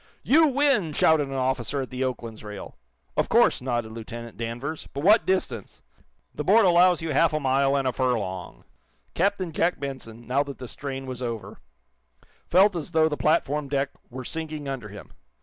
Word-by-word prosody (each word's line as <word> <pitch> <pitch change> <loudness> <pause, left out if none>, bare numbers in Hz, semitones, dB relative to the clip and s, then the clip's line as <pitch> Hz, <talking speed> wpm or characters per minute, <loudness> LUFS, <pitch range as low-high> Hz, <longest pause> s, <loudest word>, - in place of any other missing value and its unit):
"You 315 +3 +5
win!" 275 - +2
shouted 150 -1 +3
an 135 - -6
officer 130 +1 -1
at 130 - -10
the 130 +1 -2
"Oakland's" 115 -4 -4
rail. 105 -2 -8 0.4
"Of - - 0
course," - - +4
nodded 120 -3 -2
Lieutenant 115 +1 -8
Danvers, 120 +7 -5
"But 140 - -3
what 210 +5 +5
distance?" 130 - -2 0.5
"The 150 - -4
board 205 +6 +5
allows 175 -1 +5
you 160 -2 -2
half 160 +3 +3
a 155 - +1
mile 135 0 +2
and 135 -1 0
a 130 - 0
furlong." 105 -9 -2 0.5
Captain 190 -1 0
Jack 170 +3 0
Benson, 125 -5 -7
now 130 +4 +1
that 140 -1 -5
the 125 - -8
strain 135 +1 -6
was 130 -1 -6
over, 115 -3 -5 0.9
felt 190 +2 +5
as 170 0 -5
though 160 0 +4
the 150 - -2
platform 150 -2 +1
deck 140 0 0 0.2
were 130 +1 -7
sinking 155 -1 -5
under 130 -6 -5
him. 100 +1 -12
140 Hz, 180 wpm, -25 LUFS, 120-160 Hz, 0.9 s, You